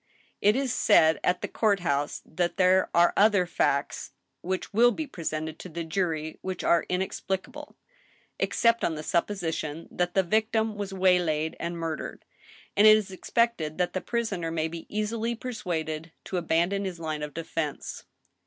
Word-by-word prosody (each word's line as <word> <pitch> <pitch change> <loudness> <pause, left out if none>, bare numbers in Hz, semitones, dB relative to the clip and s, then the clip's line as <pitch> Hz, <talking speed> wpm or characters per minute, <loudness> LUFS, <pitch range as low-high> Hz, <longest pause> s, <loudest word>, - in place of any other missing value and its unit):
" - - -39
It 210 +2 +4
is 265 -2 0
said 160 -1 +5
at 180 - +1
the - - 0
court 205 -4 +1
house 145 -3 -1
that 175 +3 -2
there 185 0 +4
are 175 0 +4
other 205 -3 +4
facts 140 -5 -1 0.3
which 185 +2 -3
will 235 +3 +6
be 315 +6 -3
presented 160 - -4
to 185 - -8
the 170 +1 -4
jury 160 -2 -2
which 185 -1 -4
are 170 - +3
inexplicable, 190 +9 -3 0.6
except 230 0 +2
on 165 - +1
the 155 - -6
supposition 165 -3 -2
that 175 0 -1
the 190 - +4
victim 220 +3 +1
was 205 -1 -4
waylaid 180 -5 +2
and 170 0 -3
murdered; 165 -2 -5 0.5
and 210 - +7
it 215 0 +9
is 205 -3 -4
expected 185 -6 0
that 180 -1 0
the 185 - -2
prisoner 200 -7 -2
may 160 -1 -1
be 165 0 -8
easily 220 +2 -1
persuaded 165 -10 -4
to 185 - -3
abandon 175 +4 +1
his 185 -3 -4
line 155 -2 -3
of 150 -1 -6
defense. 165 -2 -4
180 Hz, 165 wpm, -27 LUFS, 160-210 Hz, 0.6 s, it